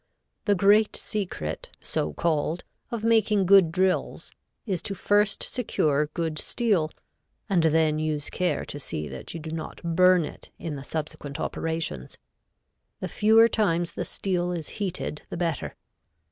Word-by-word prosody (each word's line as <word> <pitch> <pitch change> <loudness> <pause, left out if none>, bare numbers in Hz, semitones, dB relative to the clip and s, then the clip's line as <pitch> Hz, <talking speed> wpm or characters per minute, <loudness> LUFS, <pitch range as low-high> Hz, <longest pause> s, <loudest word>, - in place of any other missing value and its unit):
The 205 - +4
great 205 +3 +4
secret, 125 - -4
so 75 - -2
called, 160 - 0 0.3
of 230 -2 -4
making 215 -3 +3
good 190 -3 +6
drills, 185 +2 0 0.3
is 190 -7 -1
to 195 - -4
first 205 +2 +2
secure 150 - +1
good 160 -3 -2
steel, 200 -9 +1 0.6
and 185 -4 +3
then 155 -1 +3
use 155 -2 -2
care 180 -1 0
to 145 - -7
see 75 - -4
that 65 - -8
you - - -4
do 155 0 -7
not 160 -1 -5
burn 180 0 +4
it - - -10
in 165 - -5
the 135 - -7
subsequent 150 -2 -5
operations. 160 - -2 0.8
The - - -4
fewer 220 +2 +6
times 175 -7 +1
the - - -3
steel 180 -2 -1
is 165 -4 -4
heated 185 -5 -3
the - - -5
better. 165 -3 -2
170 Hz, 145 wpm, -26 LUFS, 155-200 Hz, 0.8 s, good